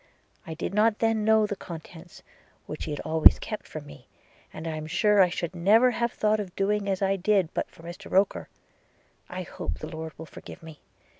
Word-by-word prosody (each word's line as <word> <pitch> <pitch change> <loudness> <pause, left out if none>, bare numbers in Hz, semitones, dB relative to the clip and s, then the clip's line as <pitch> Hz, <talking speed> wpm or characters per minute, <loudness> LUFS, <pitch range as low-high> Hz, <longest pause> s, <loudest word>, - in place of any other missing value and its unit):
– - - -32
I 160 - -5
did 170 - -4
not 210 +1 +3
then 225 -1 +1
know 220 0 +4
the 205 -1 -3
contents, 170 -1 -11 0.4
which - - -7
she - - -6
had 150 - -3
always 160 0 +6
kept 215 - -6
from 155 -2 -8
me: 145 -3 -14 0.4
and 155 - -8
I 160 -1 -3
am 155 0 -6
sure 205 +4 +3
I 180 - +5
should 175 0 -4
never 215 +8 +5
have 235 0 -1
thought 215 0 +1
of 190 -4 -6
doing 200 0 0
as 195 0 -1
I 195 0 +2
did 190 -2 +1
but - - -2
for 165 - -17
Mr 170 +1 -9
Roker 195 +1 +1 0.4
– - - -37 0.3
I 185 +1 -5
hope 180 +1 -5
the - - -7
Lord 160 -2 -7
will 160 - -8
forgive 165 - -12
me! 160 -2 -11
185 Hz, 220 wpm, -27 LUFS, 160-210 Hz, 0.4 s, always